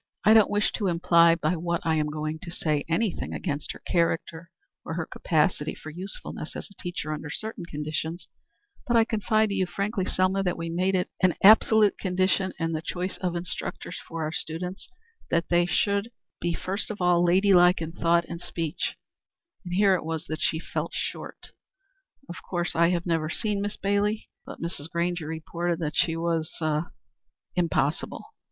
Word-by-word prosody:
I 215 Hz, -, +8 dB
don't 220 Hz, -2 st, +6 dB
wish 205 Hz, +1 st, +2 dB
to 205 Hz, -, -1 dB
imply 170 Hz, -1 st, +5 dB
by 165 Hz, +1 st, 0 dB
what 170 Hz, 0 st, -1 dB
I 160 Hz, -, +2 dB
am 155 Hz, -1 st, +1 dB
going 155 Hz, +1 st, -3 dB
to 185 Hz, -, -8 dB
say 155 Hz, -4 st, 0 dB
anything 200 Hz, +4 st, -1 dB
against 150 Hz, -4 st, -3 dB
her -, -, -14 dB
character, 170 Hz, 0 st, 0 dB, 0.3 s
or 160 Hz, -, -5 dB
her 165 Hz, -1 st, -2 dB
capacity 155 Hz, -1 st, 0 dB
for 155 Hz, -, -9 dB
usefulness 180 Hz, -2 st, -6 dB
as -, -, -6 dB
a 200 Hz, -, -12 dB
teacher 175 Hz, -3 st, -3 dB
under 150 Hz, 0 st, -6 dB
certain 215 Hz, +2 st, -5 dB
conditions, 155 Hz, +2 st, -4 dB, 0.6 s
but 240 Hz, -1 st, +4 dB
I 225 Hz, -, +5 dB
confide 220 Hz, 0 st, +1 dB
to -, -, -2 dB
you 190 Hz, -2 st, +1 dB
frankly, 200 Hz, 0 st, -2 dB
Selma, 185 Hz, +1 st, +1 dB
that 180 Hz, -2 st, -1 dB
we 165 Hz, 0 st, -4 dB
make 185 Hz, +3 st, +1 dB
it 180 Hz, -, 0 dB
an 185 Hz, -2 st, +4 dB
absolute 215 Hz, 0 st, +6 dB
condition 185 Hz, 0 st, +1 dB
in 165 Hz, -1 st, -1 dB
the 155 Hz, -1 st, -2 dB
choice 180 Hz, +3 st, -3 dB
of 180 Hz, -2 st, -2 dB
instructors 175 Hz, +1 st, -4 dB
for 165 Hz, -1 st, -4 dB
our 155 Hz, -, -2 dB
students 180 Hz, +4 st, -5 dB, 0.4 s
that 170 Hz, 0 st, +1 dB
they 175 Hz, 0 st, +3 dB
should 200 Hz, +5 st, +1 dB, 0.3 s
be 170 Hz, -1 st, -1 dB
first 195 Hz, +3 st, -3 dB
of 215 Hz, -, -5 dB
all 175 Hz, -1 st, +4 dB
lady 190 Hz, +3 st, +4 dB
like 180 Hz, 0 st, +6 dB
in 165 Hz, -1 st, -4 dB
thought 170 Hz, 0 st, +2 dB
and 170 Hz, 0 st, -7 dB
speech, 165 Hz, -4 st, -3 dB, 0.7 s
and 175 Hz, -1 st, -4 dB
here 200 Hz, 0 st, +5 dB
it 185 Hz, -, 0 dB
was 160 Hz, 0 st, -3 dB
that 155 Hz, -1 st, -5 dB
she 160 Hz, -, +2 dB
fell 160 Hz, -, -3 dB
short. -, -, -5 dB, 0.8 s
Of 175 Hz, -, -7 dB
course 175 Hz, -1 st, -2 dB
I 170 Hz, +1 st, +4 dB
have 175 Hz, -1 st, 0 dB
never 165 Hz, -3 st, 0 dB
seen 205 Hz, +3 st, -1 dB
Miss 205 Hz, +1 st, -3 dB
Bailey, 205 Hz, +2 st, 0 dB, 0.2 s
but -, -, -8 dB
Mrs. 165 Hz, -2 st, -5 dB
Grainger 170 Hz, -1 st, -1 dB
reported 170 Hz, +2 st, -2 dB
that 150 Hz, -2 st, -2 dB
she 165 Hz, -1 st, +2 dB
was 165 Hz, -1 st, -1 dB
er 155 Hz, 0 st, -1 dB, 0.6 s
impossible." 165 Hz, -4 st, 0 dB
175 Hz, 185 wpm, -27 LUFS, 165-190 Hz, 0.8 s, I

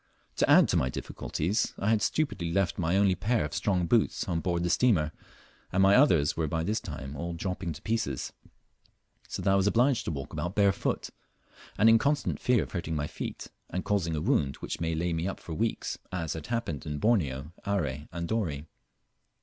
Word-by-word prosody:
To -, -, +2 dB
add -, -, +7 dB
to -, -, +2 dB
my 65 Hz, -, +1 dB
difficulties 95 Hz, -, -2 dB
I 100 Hz, +3 st, +1 dB
had 110 Hz, -2 st, +3 dB
stupidly 100 Hz, -, 0 dB
left 95 Hz, 0 st, 0 dB
my 90 Hz, +2 st, +1 dB
only 100 Hz, -1 st, +4 dB
pair 105 Hz, +3 st, 0 dB
of 75 Hz, -, -6 dB
strong 90 Hz, -4 st, 0 dB
hoots 115 Hz, +4 st, +2 dB
on 85 Hz, -3 st, 0 dB
board 85 Hz, 0 st, -1 dB
the 90 Hz, -, 0 dB
steamer, 90 Hz, -12 st, +3 dB, 0.6 s
and 95 Hz, +1 st, +3 dB
my 95 Hz, +1 st, +6 dB
others 85 Hz, -, +4 dB
were 80 Hz, -1 st, 0 dB
by 80 Hz, +2 st, -1 dB
this 105 Hz, +6 st, 0 dB
time 75 Hz, -7 st, -7 dB
all 85 Hz, +4 st, -4 dB
dropping 90 Hz, 0 st, -3 dB
to 75 Hz, -, -12 dB
pieces, 110 Hz, -, -2 dB, 0.9 s
so -, -, -5 dB
that 95 Hz, -, +3 dB
I -, -, +4 dB
was 95 Hz, 0 st, +3 dB
obliged 120 Hz, +4 st, +3 dB
to -, -, -1 dB
walk 75 Hz, 0 st, -6 dB
about 85 Hz, +5 st, -3 dB
barefooted, 100 Hz, -2 st, +1 dB, 0.6 s
and 110 Hz, -, +5 dB
in 115 Hz, 0 st, +7 dB
constant 145 Hz, +3 st, 0 dB
fear 125 Hz, -4 st, +3 dB
of -, -, -10 dB
hurting 85 Hz, -3 st, -3 dB
my 75 Hz, -1 st, -1 dB
feet, -, -, -6 dB, 0.2 s
and 90 Hz, -, -3 dB
causing 90 Hz, -6 st, 0 dB
a 75 Hz, -, -2 dB
wound 80 Hz, -, +1 dB
which -, -, -6 dB
might 80 Hz, -1 st, -1 dB
lay 85 Hz, +1 st, 0 dB
me 80 Hz, +2 st, -1 dB
up 95 Hz, -, -4 dB
for 85 Hz, -, -7 dB
weeks, 110 Hz, +6 st, -2 dB
as 80 Hz, -4 st, -2 dB
had 80 Hz, -2 st, -7 dB
happened 115 Hz, -, -3 dB
in 75 Hz, -1 st, -3 dB
Borneo, 75 Hz, -, +1 dB
Are, 100 Hz, -5 st, 0 dB, 0.3 s
and 85 Hz, 0 st, -4 dB
Dorey. 85 Hz, -10 st, -2 dB
90 Hz, 205 wpm, -29 LUFS, 80-105 Hz, 0.9 s, add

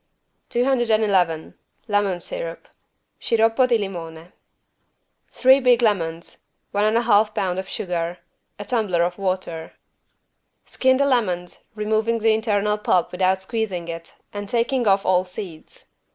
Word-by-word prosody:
211 220 Hz, -10 st, +1 dB, 0.3 s
LEMON 205 Hz, -4 st, +1 dB
SYRUP -, -, -6 dB, 0.5 s
(Sciroppo 230 Hz, +2 st, +3 dB
di 240 Hz, -2 st, +3 dB
limone) 170 Hz, -4 st, -7 dB, 1.0 s
Three 260 Hz, +1 st, +5 dB
big 250 Hz, -2 st, +3 dB
lemons. 170 Hz, -6 st, -1 dB, 0.3 s
One 205 Hz, +1 st, +1 dB
and 215 Hz, +2 st, +2 dB
a 235 Hz, -, +1 dB
half 215 Hz, -2 st, +3 dB
pound 185 Hz, -1 st, -1 dB
of 190 Hz, -, -6 dB
sugar. 175 Hz, -2 st, -3 dB, 0.4 s
A 205 Hz, -, -7 dB
tumbler 205 Hz, -7 st, +1 dB
of 175 Hz, +2 st, -2 dB
water. 185 Hz, -4 st, -3 dB, 0.9 s
Skin 260 Hz, 0 st, +2 dB
the 280 Hz, -, +2 dB
lemons, 185 Hz, -10 st, -1 dB
removing 220 Hz, +2 st, 0 dB
the 225 Hz, 0 st, +3 dB
internal 210 Hz, -1 st, 0 dB
pulp 180 Hz, -4 st, +1 dB
without 185 Hz, +1 st, +1 dB
squeezing 190 Hz, -6 st, -3 dB
it 165 Hz, 0 st, -8 dB, 0.2 s
and 205 Hz, -1 st, -6 dB
taking 240 Hz, +1 st, 0 dB
off 195 Hz, 0 st, +3 dB
all 185 Hz, -1 st, +3 dB
seeds. 180 Hz, -3 st, -10 dB
205 Hz, 130 wpm, -22 LUFS, 180-230 Hz, 1.0 s, Three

